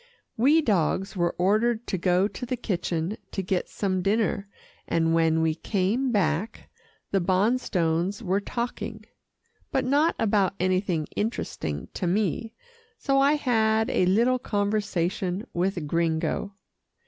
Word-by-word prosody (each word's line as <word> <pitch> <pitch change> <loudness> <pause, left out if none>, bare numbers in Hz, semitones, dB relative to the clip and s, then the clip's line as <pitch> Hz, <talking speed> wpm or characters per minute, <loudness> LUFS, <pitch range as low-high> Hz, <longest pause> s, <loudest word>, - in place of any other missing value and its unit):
We 295 +8 +4
dogs 195 - 0
were 175 -2 0
ordered 220 +5 +2
to - - -2
go 180 +2 +3
to 215 - -9
the 255 - -2
kitchen 180 -3 -2
to 195 - -3
get 185 0 -1
some 185 -2 -1
dinner, 200 0 0 0.4
and 165 -1 +1
when 160 -1 +3
we 160 -1 +2
came 205 +9 0
back, 195 +1 -1 0.4
the 195 - +2
Bonstones 185 -1 +1
were 190 0 +1
talking, 230 -1 -4 0.7
but - - 0
not 290 +5 +3
about 200 -3 +2
anything 185 -3 0
interesting 80 - -3
to 180 - -2
me, 210 +4 -1 0.4
so 275 -1 +1
I 280 +2 +5
had 220 -6 +2
a 180 - +2
little 235 +7 +3
conversation 205 -3 -1
with 175 -2 -1
Gringo. 165 +5 -1
195 Hz, 130 wpm, -26 LUFS, 175-225 Hz, 0.7 s, I